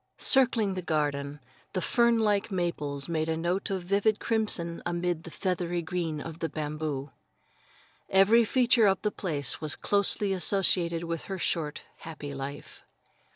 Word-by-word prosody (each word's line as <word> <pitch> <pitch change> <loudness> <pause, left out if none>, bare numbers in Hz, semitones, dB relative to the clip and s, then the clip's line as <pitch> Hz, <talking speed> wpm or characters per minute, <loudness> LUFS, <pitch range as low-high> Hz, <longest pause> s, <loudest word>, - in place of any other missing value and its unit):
Circling 240 -7 +4
the 185 - -3
garden, 145 -3 -1 0.3
the 185 - 0
fern 235 +5 +3
like 210 -1 +1
maples 150 -7 -2
made 160 -1 -1
a 160 - 0
note 175 +4 -1
of 190 -2 -2
vivid 200 +3 +1
crimson 200 -7 +1
amid 175 -1 -2
the - - -7
feathery 175 -1 -2
green 165 -2 -3
of 165 +2 -7
the 165 - -2
bamboo. 150 -2 -4 1.0
Every 200 +5 +5
feature 240 -1 +4
of 195 -1 +2
the 210 - +1
place 150 -10 -3
was 155 -2 -2
closely 200 0 +1
associated 175 -2 +1
with 165 -1 -4
her 195 - -4
short 160 -4 -2
happy 150 -3 -8
life. 135 +1 -7
175 Hz, 150 wpm, -28 LUFS, 155-200 Hz, 1.0 s, Every